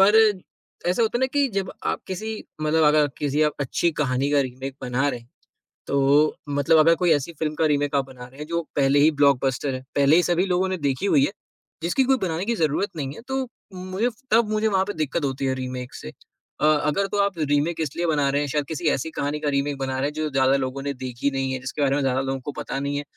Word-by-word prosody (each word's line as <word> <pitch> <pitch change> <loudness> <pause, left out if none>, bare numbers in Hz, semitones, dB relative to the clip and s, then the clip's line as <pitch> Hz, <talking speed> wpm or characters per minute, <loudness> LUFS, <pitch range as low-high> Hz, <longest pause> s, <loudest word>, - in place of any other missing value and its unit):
पर 205 +3 +6 0.7
ऐसा 210 +6 +1
होता 225 +1 +1
है - - -4
ना 260 - +3
कि 285 -1 +2
जब 195 -1 -2
आप - - -1
किसी 215 +4 -5 0.2
मतलब 155 +1 +3
अगर 150 0 +4
किसी 145 +1 +1
आप 150 -1 +2
अच्छी 145 +5 +1
कहानी 135 +1 0
का 145 -1 +4
रीमेक 130 +1 -4
बना 130 +2 0
रहे 125 - -3
हैं, 115 - -22 0.6
तो 140 +2 +3
मतलब 145 +3 +3
अगर 165 +2 +6
कोई 175 0 +2
ऐसी 145 +3 -2
फ़िल्म 155 -1 -1
का 160 - +1
रीमेक 145 -1 0
आप 140 -1 +2
बना 130 -2 -11
रहे 130 +3 -17
हैं 150 - -6
जो 170 +1 -1 0.2
पहले 140 0 +4
ही 155 +2 +5
ब्लॉकबस्टर 140 -2 +2
है, 130 - -7
पहले 140 +2 +5
ही 175 - +5
सभी 175 +2 +2
लोगों 185 0 +1
ने 185 - -1
देखी 140 +2 -1
हुई 145 -8 +4
है, - - -2 0.5
जिसकी 175 +11 +2
कोई 265 +1 +3
बनाने 175 0 -1
की 235 +2 0
जरूरत 165 +3 0
नहीं 140 -2 -3
है - - -10
तो 265 0 -1 0.3
उम, 185 - -8
मुझे, 205 +6 0 0.2
तब 225 0 +4
मुझे 215 +1 +1
वहाँ 190 -3 +2
पे 205 - -4
दिक्कत 155 +1 -2
होती 135 0 -2
है 130 - +1
रीमेक 130 -1 -5
से। - - -8 0.5
अ, - - +3
अगर 150 +5 +2
तो 205 - -3
आप 200 -3 -1
रीमेक 150 +2 0
इसलिए 160 +3 -2
बना 145 -3 +2
रहे 140 +1 +1
हैं, 145 - -1
शायद 145 +1 -1
किसी 160 +1 -3
ऐसी 160 +5 -4
कहानी 145 0 -2
का 150 - -1
रीमेक 140 0 -1
बना 130 -1 -2
रहे 135 - 0
हैं - - -11
जो 155 0 -2
ज़्यादा 135 -1 +3
लोगों 135 0 -3
ने 140 0 -2
देखी 130 +1 -3
नहीं 135 -1 -1
है, 130 - -3
जिसके 135 +3 -5
बारे 140 -1 +2
में 145 - 0
ज़्यादा 130 -1 +1
लोगों 135 0 -2
को 145 - -5
पता 135 - -4
नहीं 140 +1 -2
है, 145 - -3
145 Hz, 255 wpm, -24 LUFS, 135-170 Hz, 0.7 s, पर